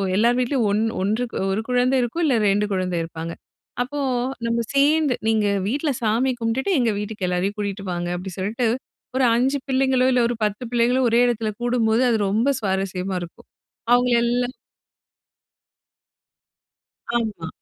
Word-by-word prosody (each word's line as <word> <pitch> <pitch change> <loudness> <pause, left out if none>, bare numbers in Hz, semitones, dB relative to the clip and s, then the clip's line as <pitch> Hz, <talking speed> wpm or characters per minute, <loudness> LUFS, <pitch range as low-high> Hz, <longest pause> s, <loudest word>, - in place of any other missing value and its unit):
எல்லார் 235 +4 +3
வீட்லயும் 245 -3 +1
ஒன் 210 +2 +1 0.2
ஒன்றுக்கு 220 +5 -1 0.2
1 205 - 0
குழந்தை 250 +1 +2
இருக்கும் 285 +9 -2
இல்ல 270 -5 +3
2 205 +1 +2
குழந்தை 185 -2 -1
இருப்பாங்க. 165 0 -6 0.5
அப்போ 290 +4 -3 0.5
நம்ம 230 0 0
சேர்ந்து 290 0 +3
நீங்க 220 -2 +2 0.2
வீட்ல 285 +6 -1
சாமி 230 +4 +2
கும்புட்டுட்டு, 235 +10 -1
எங்க 240 - +2
வீட்டுக்கு 210 -2 -4
எல்லாரையும் 180 +3 -1
கூட்டிட்டு 200 -1 -4
வாங்க 175 0 -3
அப்டின்னு 185 +1 -7
சொல்லிட்டு, 225 +5 -1 0.5
ஒரு 260 - +3
5 265 +4 +2
பிள்ளைங்களோ, 260 -1 +2
இல்ல 245 -1 +3 0.2
10 210 +2 -3
ஒரு 235 - -6
பிள்ளைங்களோ 245 +2 +3
ஒரே 235 +2 +4
எடத்துல 225 -2 -1
கூடும்போது, 240 -1 +2
அது 225 - +2
ரொம்ப 225 +7 +2
சுவாரஸ்யமா 190 -1 -2
இருக்கும். 170 - -11 0.5
அவங்கள 245 0 +3
எல்லாம் 245 +1 0 2.6
ஆமா, 220 -8 -2
230 Hz, 145 wpm, -22 LUFS, 200-250 Hz, 2.6 s, ஒரே